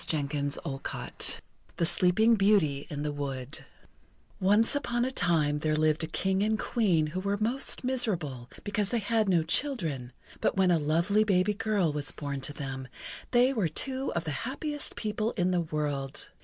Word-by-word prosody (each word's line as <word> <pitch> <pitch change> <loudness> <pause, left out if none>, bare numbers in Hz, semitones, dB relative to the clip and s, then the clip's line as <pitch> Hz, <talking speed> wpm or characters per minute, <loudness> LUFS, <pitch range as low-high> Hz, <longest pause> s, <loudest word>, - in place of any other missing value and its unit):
Charles 145 -2 -1
Perrault 135 -4 -2 0.4
THE 170 - +2
SLEEPING 180 +6 +4
BEAUTY 195 -10 +2
IN 145 0 -4
THE 150 - -1
WOOD 140 -1 -5 0.8
Once 205 +4 +4
upon 240 -4 0
a 260 - -1
time 150 - +2
there 155 0 0
lived 155 +1 +2
a - - -2
King 190 +4 0
and 215 +1 +1
Queen 190 -10 +1
who 160 +5 -4
were 200 +1 -1
most 240 +6 0
miserable 175 - -1
because 205 -1 -1
they 240 - 0
had 220 -1 +1
no 170 -3 +3
children; 160 - -1 0.3
but - - +1
when 190 -2 +4
a 170 - +3
lovely 170 +8 +2
baby 200 0 +2
girl 205 -6 0
was 145 -1 -1
born 140 -2 -5
to 135 - -1
them, 135 -3 -6 0.4
they 250 +2 +4
were 205 -10 0
two 265 - -1
of 170 - 0
the 155 - -3
happiest 295 +4 -2
people 215 +1 -2
in 185 -4 +1
the 180 -1 +2
world. 145 -4 -3
180 Hz, 170 wpm, -29 LUFS, 150-215 Hz, 0.8 s, SLEEPING